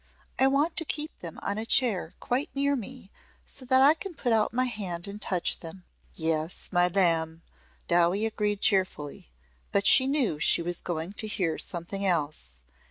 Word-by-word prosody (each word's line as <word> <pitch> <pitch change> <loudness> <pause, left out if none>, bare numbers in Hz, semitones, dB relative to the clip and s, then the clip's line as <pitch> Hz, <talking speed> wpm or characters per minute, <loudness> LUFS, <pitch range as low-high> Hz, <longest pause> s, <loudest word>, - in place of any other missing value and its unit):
I 265 - +5
want 290 +5 +1
to 330 - +1
keep 305 0 -4
them 170 -2 -8
on 200 +1 -2
a 220 - -3
chair 215 -12 +2
quite 255 +4 -1
near 280 +1 +2
me 240 -3 -8 0.3
so 265 - -8
that 260 +1 +4
I 290 +3 +7
can 345 +2 -8
put 245 -5 0
out 215 -1 +2
my 255 +3 +1
hand 195 -7 -4
and 205 +1 -8
touch 180 -3 -1
them." 170 +3 -10 0.3
"Yes, 160 0 -2
my 175 0 +3
lamb," 165 -3 0 0.4
Dowie 175 +4 +2
agreed 210 -2 -1
cheerfully. 185 - 0 0.4
But 200 0 +1
she 260 - +7
knew 270 - 0
she 170 - +3
was 175 0 -4
going 170 +2 -4
to 215 - -3
hear 180 -7 -1
something 180 +3 -4
else. 145 - -1
200 Hz, 175 wpm, -27 LUFS, 170-255 Hz, 0.4 s, I